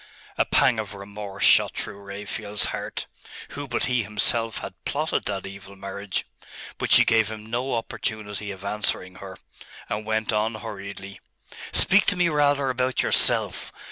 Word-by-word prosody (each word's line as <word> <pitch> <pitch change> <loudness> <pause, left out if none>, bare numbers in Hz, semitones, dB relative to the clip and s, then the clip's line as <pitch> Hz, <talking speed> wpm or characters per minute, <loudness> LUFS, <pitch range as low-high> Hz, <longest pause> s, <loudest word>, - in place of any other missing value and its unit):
A - - +2
pang 120 -4 +3
of 105 -1 -5
remorse 100 0 -6
shot - - +5
through 100 -2 -5
Raphael's 100 +1 -2
heart. - - -4 0.4
Who 145 0 -6
but 120 - 0
he 125 -2 +1
himself 110 +2 +2
had - - -6
plotted 155 +3 -1
that 100 -2 -3
evil 100 0 -9
marriage? 100 0 -4 0.5
But - - -2
she - - +8
gave 110 -1 +3
him 110 -1 -7
no 125 +2 -1
opportunity 105 -2 -3
of 95 0 -8
answering 100 -3 -1
her, 95 -1 -9 0.5
and 105 +1 -3
went 110 0 -1
on 110 +1 +1
hurriedly 100 -3 -7 0.5
'Speak 195 +1 +5
to 200 - +3
me 175 -1 +3
rather 145 -3 +2
about 125 0 0
yourself. - - +2
105 Hz, 155 wpm, -25 LUFS, 100-120 Hz, 0.5 s, she